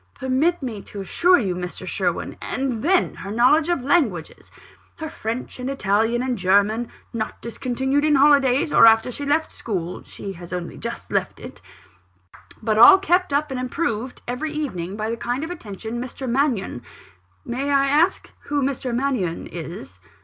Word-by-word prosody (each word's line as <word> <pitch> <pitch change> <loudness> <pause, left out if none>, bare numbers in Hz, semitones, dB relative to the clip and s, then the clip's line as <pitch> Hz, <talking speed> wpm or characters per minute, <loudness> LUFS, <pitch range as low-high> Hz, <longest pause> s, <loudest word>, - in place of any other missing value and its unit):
"Permit 275 +6 0
me 225 -6 -4
to 200 - -8
assure 355 - +3
you, 195 - -1
Mr. 180 0 -6
Sherwin - - -2
" - - -34 0.2
"And 255 -4 -1
then, 360 +5 +2
her 195 - -7
knowledge 255 +9 +3
of 345 -7 0
languages 250 - 0 0.5
her 315 -2 -6
French, 230 +2 -5
and 250 +1 -3
Italian, 225 -1 +1
and 250 -4 -2
German, 205 +5 +2 0.2
not 220 -2 -4
discontinued 265 +4 -1
in 305 -1 +4
holidays, 280 0 +4
or - - +8
after 225 +2 +4
she 285 +3 -5
left 315 +2 +1
school 180 -5 -4
(she 195 - -8
has 175 -1 -11
only 180 -2 -4
just - - -6
left - - -1
it); - - -10 1.0
but 215 -1 +1
all 385 +12 +10
kept 370 -3 +1
up 290 +1 0
and 260 - -3
improved 250 -2 -3
every 250 +6 -3
evening, 195 - -4
by 215 0 -2
the 230 +1 -2
kind 245 +5 -2
attention 230 - -6
of 240 - -3
Mr. 265 +2 -7
Mannion 240 - 0 0.3
" 90 +1 -37
"May 275 +3 -2
I 275 -1 +3
ask 305 +7 +2
who 290 -1 0
Mr. 260 -2 -2
Mannion 245 -10 -1
is?" 165 - -8
250 Hz, 170 wpm, -22 LUFS, 210-285 Hz, 1.0 s, all